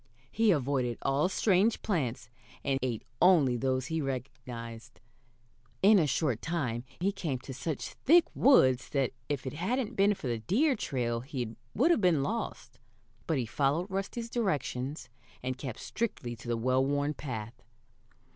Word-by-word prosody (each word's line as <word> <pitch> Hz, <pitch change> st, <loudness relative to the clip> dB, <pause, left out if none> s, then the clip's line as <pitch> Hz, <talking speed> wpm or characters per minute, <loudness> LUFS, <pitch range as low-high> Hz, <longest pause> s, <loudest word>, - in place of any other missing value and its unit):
He 225 Hz, 0 st, +3 dB
avoided 130 Hz, -, +1 dB
all 140 Hz, +6 st, +2 dB
strange 200 Hz, +3 st, +2 dB
plants, 130 Hz, -, -1 dB, 0.4 s
and 135 Hz, -1 st, 0 dB
ate 120 Hz, -4 st, -2 dB, 0.2 s
only 160 Hz, -9 st, +5 dB
those 130 Hz, +1 st, 0 dB
he 160 Hz, -1 st, -2 dB
recognized. 125 Hz, -3 st, -6 dB, 0.8 s
In 205 Hz, +1 st, +7 dB
a 155 Hz, -, +2 dB
short 135 Hz, -5 st, 0 dB
time 130 Hz, -8 st, -2 dB
he 190 Hz, +3 st, +1 dB
came 160 Hz, -9 st, -3 dB
to 135 Hz, -, -8 dB
such 150 Hz, +2 st, -4 dB
thick 335 Hz, +4 st, +5 dB
woods 130 Hz, -, +5 dB
that 135 Hz, -4 st, 0 dB, 0.2 s
if 140 Hz, -3 st, -2 dB
it 130 Hz, -, -4 dB
hadn't 230 Hz, -, -1 dB
been 205 Hz, +1 st, +4 dB
for -, -, -10 dB
the 120 Hz, -2 st, -1 dB
deer 255 Hz, -, +2 dB
trail 120 Hz, -, -1 dB
he 120 Hz, -3 st, -5 dB, 0.2 s
would 295 Hz, -, +4 dB
have 335 Hz, -, +3 dB
been 170 Hz, -7 st, +3 dB
lost, 230 Hz, +9 st, -4 dB, 0.5 s
but 160 Hz, -, +1 dB
he 125 Hz, -, 0 dB
followed 145 Hz, -, 0 dB
Rusty's 230 Hz, +5 st, -3 dB
directions, 150 Hz, -, -2 dB, 0.4 s
and 130 Hz, 0 st, -2 dB
kept 130 Hz, -3 st, -6 dB
strictly 160 Hz, -, -3 dB
to 115 Hz, +1 st, -12 dB
the 120 Hz, -1 st, 0 dB
well 130 Hz, +3 st, +2 dB
worn 145 Hz, +2 st, 0 dB
path. 120 Hz, -4 st, -6 dB
140 Hz, 155 wpm, -30 LUFS, 125-190 Hz, 0.8 s, In